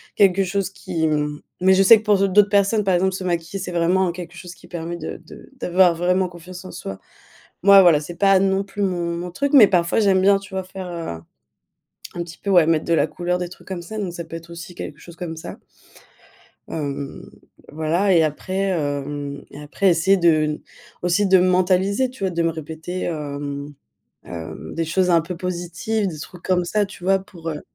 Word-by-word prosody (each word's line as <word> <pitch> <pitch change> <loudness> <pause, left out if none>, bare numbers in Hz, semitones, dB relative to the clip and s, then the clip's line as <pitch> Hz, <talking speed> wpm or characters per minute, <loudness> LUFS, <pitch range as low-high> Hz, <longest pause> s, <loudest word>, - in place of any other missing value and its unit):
quelque 195 -1 +4
chose 195 +1 -1
qui 180 -4 -4
m 150 -1 -1 0.2
mais 190 +1 +5
je 190 - +4
sais 220 +4 +9
que - - -13
pour 210 -2 +3
d'au 195 - +3
d'autres 205 +2 +5
personnes, 200 +1 +2
par 190 - +2
exemple, 190 +2 +1
se 185 - -5
maquiller, 175 +2 -2
c'est 180 -1 -5
vraiment 175 +1 +2
quelque 175 -1 -9
chose 180 -1 -9
qui - - -17
permet 170 0 -5
de 160 - -6
de - - -13
d'avoir 180 -4 +3
vraiment 180 +2 +1
confiance 180 +1 -11
en 185 - -8
soi. 95 0 -7 0.6
Moi, 200 0 +8
voilà, 170 -5 +5
c'est 170 +3 -8
pas 195 +1 +4
non 195 0 +1
plus 205 +1 -5
mon 175 -3 -1
mon 175 +1 -5
truc. 280 - -1
Mais 245 -7 +9
parfois, 175 +2 +1
j'aime 195 -3 +3
bien 200 +1 +5
tu 195 0 -14
vois 190 - -1
faire, 185 0 -8
heu, - - -7 0.2
un 85 0 -7 0.9
un 175 - -3
petit 165 -1 -12
peu, 200 - -4
ouais, 175 -4 +6
mettre 160 -1 +2
de 170 - +2
la - - +3
couleur, 180 0 -2
des 180 -1 -3
trucs 180 - -15
comme 190 -2 -4
ça, 215 +5 -7
donc 190 -4 -3
ça 170 -1 -5
peut 165 - -8
être 165 +1 -11
aussi 170 +1 -9
quelque 150 - -7
chose 170 -1 -13
comme 165 -2 -6
ça. 160 - -8 1.1
Hem, 140 -2 -5 0.4
voilà, 165 +6 +1
et 165 -2 +5
après, 155 +5 -3
hem 145 -3 -3
et 145 - -10
après 150 +6 -1
essayer 180 +3 +3
de 170 -2 +4
n 155 -1 -1 0.4
aussi 180 +3 +2
de 190 0 +6
me 180 - +3
mentaliser, 185 +6 +2
tu 250 -6 -9
vois, 190 - 0
de 170 -1 -1
me 165 - +2
répéter, 160 +3 -6
hem 145 -2 -5 0.5
hem, 80 -3 -8
des 165 - -1
choses 180 +2 +1
un 170 -1 +5
peu 170 +2 -6
positives, 180 +4 -2
des 160 -4 -7
trucs 175 +3 -10
comme 180 -1 +1
ça, 205 +3 0
tu 185 -2 -12
vois, 195 +1 +3
pour, 175 -4 -8
heu. 150 -2 -5
175 Hz, 220 wpm, -21 LUFS, 165-190 Hz, 1.1 s, sais